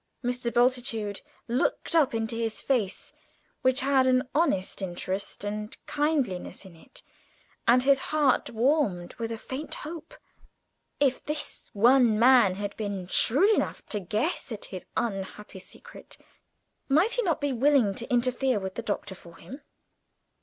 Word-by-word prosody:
Mr. 245 -1 -1
Bultitude 240 -4 0 0.3
looked 245 +7 -1
up 305 -8 +3
into 225 0 -2
his 230 -1 -2
face, 220 -9 -2 0.5
which 260 0 +2
had 265 -1 +3
an 255 0 +2
honest 275 - 0
interest 190 +2 -4
and 210 +1 -5
kindliness 285 - -1
in 185 -3 -13
it, 160 - -15 0.6
and 250 +1 +5
his 275 0 +4
heart 295 -4 +2
warmed 225 - 0
with 230 0 -3
a 225 - -3
faint 265 +6 -6
hope. 325 +8 -8 0.8
If 270 -3 +1
this 300 0 -5
young 235 +1 +5
man 235 -5 +5
had 205 +1 -5
been 200 -4 -4
shrewd 280 - +4
enough - - -2
to 210 - -2
guess 215 - -2
at 215 - -5
his 185 - -7
unhappy 200 -2 -4
secret, - - -12 0.7
might 320 +11 +4
he - - +1
not 340 -8 0
be 285 -2 -1
willing 255 -4 +3
to 235 +6 -5
intercede 250 0 +1
with 190 0 -4
the 235 - -4
Doctor 205 -3 -3
for 170 -2 -14
him? 270 +3 -11
240 Hz, 145 wpm, -27 LUFS, 205-275 Hz, 0.8 s, and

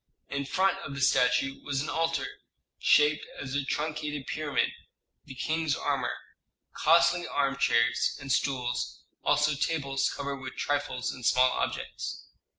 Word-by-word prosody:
In 140 0 -2
front 190 +5 +2
of 140 -7 -7
the 140 - -4
statue 125 +1 +3
was 140 -1 -1
an - - -4
altar 165 0 0 0.5
shaped 150 +1 +4 0.2
as 130 0 -5
a 140 0 0
truncated 150 0 -3
pyramid, 150 -2 0 0.5
the 135 - -10
king's 160 +1 0
armor, 140 -4 -1 0.6
costly 170 +2 +4
armchairs 120 -3 +2
and 135 0 -5
stools, 125 - -1 0.2
also 150 +1 +3
tables 140 -2 0
covered 140 0 -4
with 130 -1 -7
trifles 145 -3 -1
and 125 - -10
small 125 +2 +4
objects. - - -3
140 Hz, 135 wpm, -29 LUFS, 130-150 Hz, 0.6 s, shaped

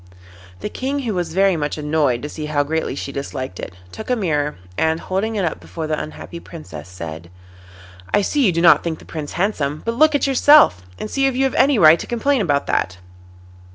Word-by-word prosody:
The - - -3
King, 275 +5 -3
who 230 -5 -2
was 175 -3 -2
very 195 -1 +4
much 150 -1 -2
annoyed 150 -5 0
to 150 - -4
see 150 0 -6
how 145 -1 +1
greatly 160 -1 -2
she 140 - -5
disliked 130 -7 -5
it, 90 - -7 0.2
took 220 - -8
a 250 - +3
mirror, 150 -9 -1 0.2
and 160 - +1
holding 200 +6 -2
it 200 -3 0
up 160 - -3
before 165 -2 -6
the 155 - -2
unhappy 170 +2 -8
Princess, 90 - -10
said: 85 -2 -8 0.8
'I 205 - +3
see 290 +7 +1
you - - +3
do 170 0 -1
not 170 - +6
think 165 -2 -3
the - - -16
Prince 150 -3 -6
handsome, 155 -7 -1
but 230 - 0
look 310 +5 +4
at 285 - +1
yourself, 275 - +5 0.2
and - - -5
see 270 +5 +1
if 265 - -1
you 265 - +1
have 270 - +1
any 275 -1 +3
right 160 -2 +7
to - - -6
complain 245 +2 +1
about 145 -7 +1
that. 90 0 -1
165 Hz, 220 wpm, -20 LUFS, 145-225 Hz, 0.8 s, right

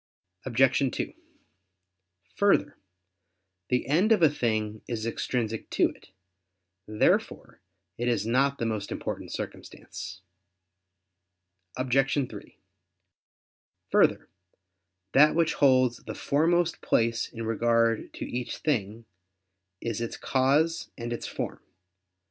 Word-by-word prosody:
Obj. 130 +2 +3
2: - - -4 1.2
Further, 200 -7 +2 0.9
the 125 0 +1
end 175 +10 +2
of 210 -6 +4
a 155 - +6
thing 110 -5 -1
is 115 -2 -3
extrinsic 115 -1 -2
to - - +2
it. - - -16 0.8
Therefore 105 0 0 0.4
it 120 - -1
is 115 -4 +1
not 135 +4 +2
the 115 - -2
most 105 -3 -3
important - - -5
circumstance. 95 +2 -7 1.6
Obj. 135 +1 +1
3: - - -11 1.3
Further, - - +3 0.8
that 150 +3 +6
which 165 -1 +2
holds 130 -4 +4
the - - -8
foremost 165 +3 +1
place 115 0 +1
in 115 -1 -6
regard 115 0 +1
to - - -5
each 120 -1 -4
thing, 115 -6 -2 0.8
is 115 -1 -3
its 115 - -4
cause 145 +5 +1
and 120 -1 -4
its 120 - -5
form. - - -5
125 Hz, 110 wpm, -27 LUFS, 115-140 Hz, 1.6 s, a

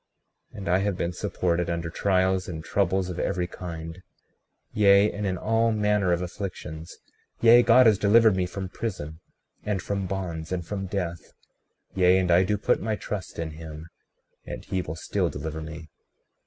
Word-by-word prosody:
36:27 - - -12
And 95 -3 -5
I 90 - +4
have 100 -2 -1
been 85 +1 -2
supported 85 0 -1
under 85 -1 -2
trials 95 0 +1
and 80 -2 -6
troubles 95 +1 0
of 90 - -6
every 90 -2 -1
kind, 85 -1 -7 0.7
yea, 100 0 +5
and 105 0 -3
in 95 -1 -1
all 115 +4 +1
manner 105 -3 +1
of 85 +1 +1
afflictions; 85 -4 -7 0.4
yea, 120 +1 +7
God 125 +1 +6
has 105 -3 +5
delivered 110 0 +5
me 90 -1 0
from 95 +1 -5
prison, 80 -7 -5 0.4
and 105 -2 -1
from 100 0 -3
bonds, 90 -4 -4
and 90 -2 -2
from 95 +1 -4
death; 90 -3 -4 0.6
yea, 90 0 +4
and 90 -2 +1
I 90 +2 +6
do 105 +2 0
put 105 - +1
my 110 0 -1
trust 105 -2 -6
in 80 -1 -3
him, 80 +1 -9 0.5
and - - -8
he 95 - -1
will 80 -2 -6
still 80 - -1
deliver 80 +1 -5
me. 80 0 -8
95 Hz, 175 wpm, -26 LUFS, 85-100 Hz, 0.7 s, yea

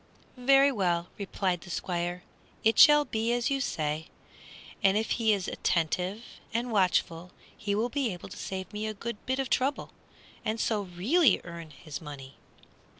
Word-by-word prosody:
"Very 275 +2 +5
well," 175 -7 0
replied 190 -3 -1
the 175 - -12
Squire, 175 0 -3 0.4
"it 225 +1 +3
shall 295 0 +8
be 225 -2 -1
as 240 +2 0
you 275 0 +1
say, 155 - -2 0.7
and 195 +1 +4
if 220 - -1
he 225 -2 +2
is 195 -3 0
attentive 180 +6 -1 0.3
and 235 +1 -2
watchful 180 -3 +1 0.2
he 205 -1 -2
will 225 +4 0
be 270 -4 -1
able 180 0 -8
to 200 - -9
save 190 -1 -6
me 210 +1 -3
a 215 - -4
good 235 +1 -6
bit 260 +1 0
of 270 -1 -1
trouble 270 +4 0 0.5
and 220 +1 -2
so 215 -2 +1
really 200 - +3
earn 170 -2 -8
his 155 +1 -9
money." 140 -3 -9
205 Hz, 165 wpm, -29 LUFS, 175-235 Hz, 0.7 s, shall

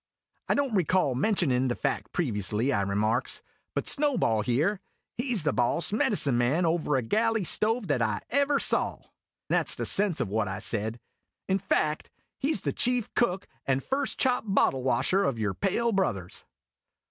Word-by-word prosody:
" - - -40
I - - +3
don't 280 -4 0
recall 185 -6 +2
mentionin' 130 - +1
the 120 - -1
fact 105 +1 -3
previously," 115 - -1
I 100 - +1
remarks, 105 +5 -1
" - - -48
but - - -1
Snowball 270 - +2
here 145 - 0 0.3
he 245 0 -1
V 190 - +2
the 145 - +1
boss 140 +9 0
medicine 145 - +2
man 140 +9 +1
over 160 -3 0
a 130 - 0
galley 220 - +1
stove 220 +5 +1
that 145 -8 0
I 110 -2 -1
ever 280 +2 +2
saw" - - 0 0.5
(that - - +1
's - - +3
the - - -3
sense 195 -5 +2
of - - -1
what 105 +1 -1
I 95 - -4
said) 110 +1 -3 0.5
"in 190 +1 +1
fact, 155 -5 -1 0.3
he 280 - 0
's - - 0
the - - -2
chief 245 -2 +1
cook 195 -5 0 0.2
and 135 0 +1
first 275 +1 -2
chop 250 -3 +2
bottle 165 -9 +2
washer 185 +9 +1
of 135 -11 0
your 105 -3 -1
pale 230 - 0
brothers 105 - -2
155 Hz, 180 wpm, -27 LUFS, -, 0.5 s, I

